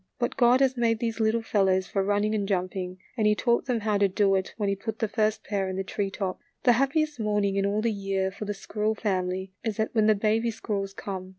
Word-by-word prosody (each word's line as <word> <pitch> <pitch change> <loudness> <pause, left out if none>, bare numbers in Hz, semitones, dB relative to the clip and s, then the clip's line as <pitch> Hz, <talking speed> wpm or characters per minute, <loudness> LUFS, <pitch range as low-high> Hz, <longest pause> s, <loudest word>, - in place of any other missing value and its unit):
But 240 0 -1
God 245 +1 +5
has 265 -1 +3
made 230 -1 +2
these 230 0 -3
little 225 +1 +2
fellows 190 -3 +2
for 195 +2 -1
running 205 +2 +1
and 205 -2 -1
jumping, 185 -1 -2 0.2
and 220 -3 +2
he 210 - +4
taught 235 +2 +1
them 240 -3 0
how 210 -1 +1
to 200 - +4
do 195 +1 +2
it 190 0 0
when 210 -2 -1
he 200 - +1
put 220 +2 -5
the 220 - 0
first 215 0 0
pair 195 -2 -2
in 185 - -3
the 195 - -2
tree 200 +1 -2
tops. 190 -1 -4 0.2
The 245 - +6
happiest 275 +3 +1
morning 210 -2 +1
in 200 0 +1
all 210 +2 0
the 230 - +2
year 195 -2 -1
for 205 +2 -7
the 205 0 -3
squirrel 215 +2 -2
family 190 -2 -2
is 220 -3 -2
that 220 - -1
when 215 -2 +3
the 215 - +5
baby 220 +3 +1
squirrels 200 -3 -3
come. 185 -2 -6
210 Hz, 250 wpm, -27 LUFS, 195-225 Hz, 0.2 s, The